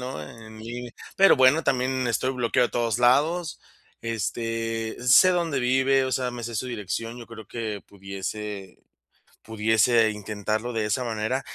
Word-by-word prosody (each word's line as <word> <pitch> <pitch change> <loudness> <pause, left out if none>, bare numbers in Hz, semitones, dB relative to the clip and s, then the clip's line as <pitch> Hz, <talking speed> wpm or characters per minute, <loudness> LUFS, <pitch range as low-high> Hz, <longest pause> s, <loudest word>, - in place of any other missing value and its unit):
¿no?, 125 -10 -5
en 110 +6 -12
línea. 120 +2 -7 0.2
Pero 195 -5 +6
bueno, 130 +5 +5
también 130 0 0
estoy 130 +3 0
bloqueado 125 0 +1
de - - -24
todos 120 -1 0
lados. 150 +7 +2 0.4
Este, 115 0 -3
sé 125 +9 +6
dónde 170 -6 0
vive, 130 +2 +2
o 130 - -3
sea, 125 -1 0
me 120 -1 -7
sé 115 0 -5
su 115 - -2
dirección. 115 0 -4
Yo 120 - -10
creo, 110 -3 -11
que 110 -3 -5
pudiese 100 0 -7 0.7
pudiese 110 +1 +3
intentarlo 110 +3 -3
de 110 -1 -1
esa 110 +4 -1
manera. 115 +3 -2
115 Hz, 155 wpm, -25 LUFS, 110-130 Hz, 0.7 s, Pero